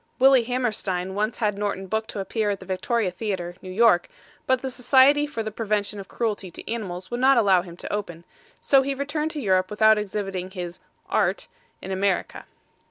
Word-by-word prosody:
Willie 265 -2 +6
Hammerstein 215 -7 -2
once 215 +3 -1
had 210 -3 -1
Norton 200 -2 -2
booked 220 +3 -2
to - - -5
appear 210 +2 -1
at 200 -1 -2
the - - -11
Victoria 195 +2 -1
Theater, 180 -3 -4
New 185 - -9
York, 190 -2 +3 0.4
but 260 0 +2
the 265 - -2
Society 270 +4 +4
for 230 -6 -4
the 215 - -4
Prevention 210 -1 -2
of 195 - -8
Cruelty 210 -5 -2
to 170 - -12
Animals 190 -5 -5
would 240 - -2
not 265 +1 +5
allow 195 -5 +5
him 175 -1 -11
to - - -6
open; 175 -5 -4 0.4
so 275 -1 +4
he 275 +1 -2
returned 295 +3 -2
to 310 - -5
Europe 185 -6 +2
without 215 +1 +4
exhibiting 195 -3 -4
his 180 -1 -6 0.3
art - - 0 0.2
(?) 480 - -39
in 190 - -5
America. 190 0 -1
210 Hz, 195 wpm, -24 LUFS, 190-240 Hz, 0.4 s, Willie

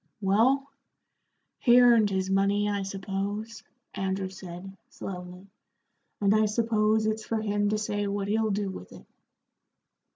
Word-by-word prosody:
"Well, 230 +8 +2 0.9
he 240 -1 +6
earned 235 -4 +5
his 190 -1 -1
money, 200 +1 +2
I 205 -1 -1
suppose," 200 +3 -4 0.3
Andrew 190 0 -2
said, 185 +1 -9
slowly, 180 0 -8 0.7
"and 200 0 +3
I 215 0 +3
suppose 220 0 +1
it's 215 0 -1
for 225 - -2
him 205 -1 0
to 215 - 0
say 205 -1 -2
what 200 0 -2
he'll 220 +1 +1
do 200 -1 -1
with 90 - -10
it." - - -14
205 Hz, 135 wpm, -27 LUFS, 195-215 Hz, 0.9 s, he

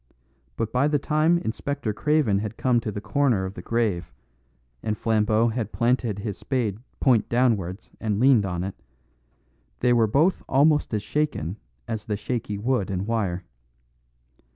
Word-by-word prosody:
But 110 -1 -2
by 130 +3 +2
the 150 -1 +2
time 155 +4 +2
Inspector 120 -5 -3
Craven 145 -5 +2
had 105 +1 -5
come 125 -2 +2
to 110 -2 -4
the 100 - -5
corner 125 -7 +1
of 95 - -5
the - - -8
grave, 110 -7 -1 0.7
and 105 0 -2
Flambeau 110 +1 +2
had 110 -2 -3
planted 120 -3 +1
his 105 -1 -5
spade 115 -7 -1 0.2
point 120 -6 +3
downwards 110 -6 0
and 105 -2 -1
leaned 125 -3 +5
on 90 -2 -2
it, 95 0 -4 1.1
they 125 0 +4
were 115 -2 +4
both 155 - +2
almost 150 +2 +3
as 105 - -2
shaken 110 - -2 0.3
as 110 -2 -4
the 105 -2 -1
shaky 105 -2 -3
wood 115 -2 0
and 95 0 -2
wire. 100 -6 -1
115 Hz, 155 wpm, -25 LUFS, 105-130 Hz, 1.1 s, leaned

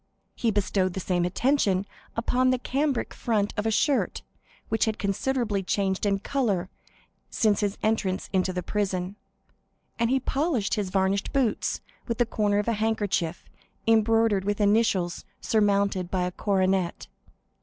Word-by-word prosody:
He 235 - 0
bestowed 195 -3 +1
the - - -2
same 180 -1 0
attention 200 -1 +1 0.3
upon 250 +2 +2
the 255 - +3
cambric 270 +1 -1
front 210 -3 0
of 210 +1 -1
a - - +3
shirt, 270 +5 +1 0.4
which 225 - +1
had 220 -1 -1
considerably 210 +1 -1
changed 190 +1 0
in 200 -1 +2
color 200 -5 -1 0.6
since 210 -3 +2
his 205 -1 -1
entrance 210 -4 0
into 185 0 +2
the 180 -1 -3
prison, 190 -1 -2 0.8
and 230 0 +2
he 265 +1 +3
polished 265 - 0
his 205 -4 -1
varnished 195 +1 0
boots 260 -6 0 0.3
with 230 -2 -2
the 240 - +3
corner 210 -3 0
of 210 - 0
a 230 - +2
handkerchief 205 -6 -1 0.4
embroidered 225 -2 +3
with 205 +1 -1
initials 205 -4 +2 0.2
surmounted 200 -4 +1
by 185 -1 0
a 180 - -1
coronet. 190 -2 0
205 Hz, 145 wpm, -26 LUFS, 190-225 Hz, 0.8 s, the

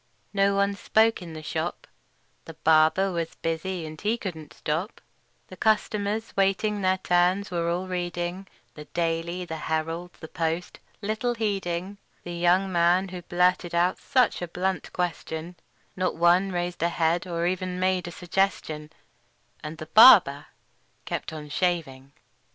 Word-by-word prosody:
No 200 0 +3
one 200 0 +2
spoke 220 +2 +2
in 170 -2 -8
the 155 0 -8
shop: - - -3 0.6
The 165 - -10
barber 160 +5 +3
was 170 -2 -3
busy, 165 +1 -3
and 155 0 -9
he 215 +3 +1
couldn't 160 -9 -7
stop; 165 +8 -3 0.5
The - - -9
customers, 215 0 0
waiting 195 +2 +1
their 185 0 +2
turns, 180 +2 +1
were 170 -1 -1
all 175 +2 -1
reading 175 +1 -3 0.3
The 150 - -10
"Daily," 170 +2 -2
the 160 -2 -5
"Herald," 165 +3 -2
the 160 - -11
"Post," 165 +1 -3 0.2
little 220 +4 -1
heeding 195 -3 -2 0.2
The 175 - -6
young 175 +3 +2
man 175 +2 +3
who 180 -1 -7
blurted 180 0 +1
out 175 +2 +2
such 250 -7 +2
a 175 - -3
blunt 180 0 -2
question; 170 -1 -4 0.4
Not 185 0 -1
one 175 +3 +3
raised 175 -1 -3
a 170 - +2
head, 170 +1 0
or 170 -1 -2
even 180 0 -2
made 185 -1 +1
a - - -6
suggestion; 175 -4 -2 0.7
And 155 +1 -6
the 155 - -7
barber 175 - +7 0.6
kept - - -4
on 155 -1 -7
shaving. 145 -6 -2
175 Hz, 150 wpm, -26 LUFS, 165-190 Hz, 0.7 s, barber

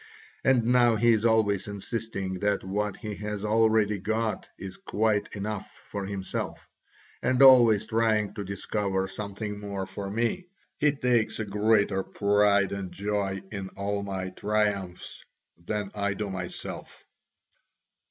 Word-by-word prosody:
And 130 -3 +4
now 120 -1 +4
he 120 +2 +4
is 110 0 +2
always 110 -4 +2
insisting 100 -2 -4
that 105 0 0
what 105 +1 -2
he 105 -1 -5
has 105 0 -4
already 110 -1 +3
got 110 +3 -2
is 95 -1 -8
quite 105 -1 0
enough 105 0 -4 0.2
for 100 -1 -3
himself, 100 -2 -4 0.6
and 125 0 +1
always 120 -6 +7
trying 110 -2 +1
to 105 - -5
discover 100 0 -2
something 105 +1 -5
more 100 -2 -4
for 95 +1 -6
me: 120 - -1 0.3
he 150 -1 +3
takes 125 -6 +1
a 110 - -1
greater 105 -1 +2
pride 100 0 +2
and 100 -2 -4
joy 100 0 -2
in 100 -3 -5
all 100 +1 -1
my 95 -2 -4
triumphs 100 -2 -2 0.4
than 105 +1 -3
I 100 -1 -1
do 105 -1 -3
myself." 90 -2 -6
105 Hz, 135 wpm, -27 LUFS, 100-110 Hz, 0.6 s, always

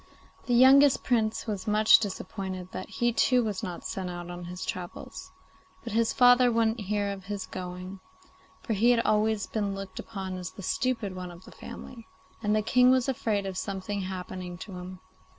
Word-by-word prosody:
The 245 - +2
youngest 270 +3 +7
Prince 225 -3 +1
was 210 -1 -4
much 215 +1 +6
disappointed 190 -2 -5
that 185 - -6
he 240 0 0
too 250 +1 +3
was 210 -4 -2
not 175 -1 -6
sent 185 -2 -4
out 175 0 -6
on 175 0 -7
his 180 +1 -6
travels; 180 -1 -7 0.5
but - - -6
his 230 0 +2
father 245 0 +6
wouldn't 225 0 +1
hear 205 0 -1
of 195 -2 -8
his 200 -1 -4
going, 185 +1 -7 0.6
for 230 - -1
he 220 +4 +3
had 240 -1 +4
always 215 -1 +1
been 205 -3 -2
looked 195 -1 -7
upon 190 -4 -5
as 180 - -6
the 195 - -10
stupid 230 -3 -1
one 180 -1 -6
of 175 +1 -13
the - - -13
family, 230 -2 -10 0.3
and 210 -1 +1
the 215 - +1
King 250 +3 +5
was 255 0 +3
afraid 220 -6 -1
of 190 -1 -3
something 200 +1 -3
happening 185 -1 -6
to 200 - -9
him. 180 +1 -8
205 Hz, 185 wpm, -28 LUFS, 185-230 Hz, 0.6 s, youngest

